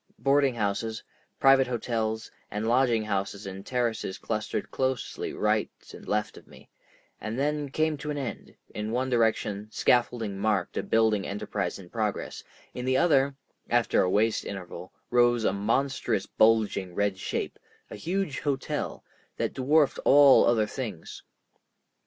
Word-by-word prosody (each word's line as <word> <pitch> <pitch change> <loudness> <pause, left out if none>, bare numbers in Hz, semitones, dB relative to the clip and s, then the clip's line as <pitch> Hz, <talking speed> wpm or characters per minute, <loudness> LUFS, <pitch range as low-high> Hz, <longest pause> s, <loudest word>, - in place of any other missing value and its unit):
Boarding 140 -2 +2
houses, 110 +1 -2 0.4
private 135 -1 +5
hotels, 115 -2 -2 0.2
and 105 +2 -3
lodging 120 -2 +3
houses 100 -1 -3
in 95 0 -7
terraces 115 -5 -2
clustered 110 -1 -3
closely 130 -2 -2
right 105 0 +1 0.2
and - - -12
left 105 0 -1
of - - -15
me, - - -17 0.5
and 110 +2 -5
then 145 +1 -1
came 155 +2 0
to 150 +1 -6
an 150 - -2
end; 135 -4 -6 0.2
in 105 +1 -4
one 130 +2 -1
direction 110 -3 +1
scaffolding 115 -4 +1
marked 105 -1 0
a - - 0
building 110 -3 +2
enterprise 100 - -3
in 95 -3 -12
progress, 105 +1 -3 0.3
in 125 - -5
the 130 +1 +2
other, 140 -4 +3 0.3
after - - +3
a 90 - +2
waste 110 +4 +2
interval, 90 -2 -7 0.2
rose 120 -1 +4
a 95 - +2
monstrous 115 0 0
bulging 105 -5 +2
red 100 -2 0
shape, - - -3 0.3
a - - -6
huge 180 -4 -2
hotel, 140 -3 -3 0.3
that - - -1
dwarfed 145 +3 +2
all 140 -1 +7
other 115 -2 +3
things. 105 - -6
115 Hz, 145 wpm, -27 LUFS, 105-130 Hz, 0.5 s, all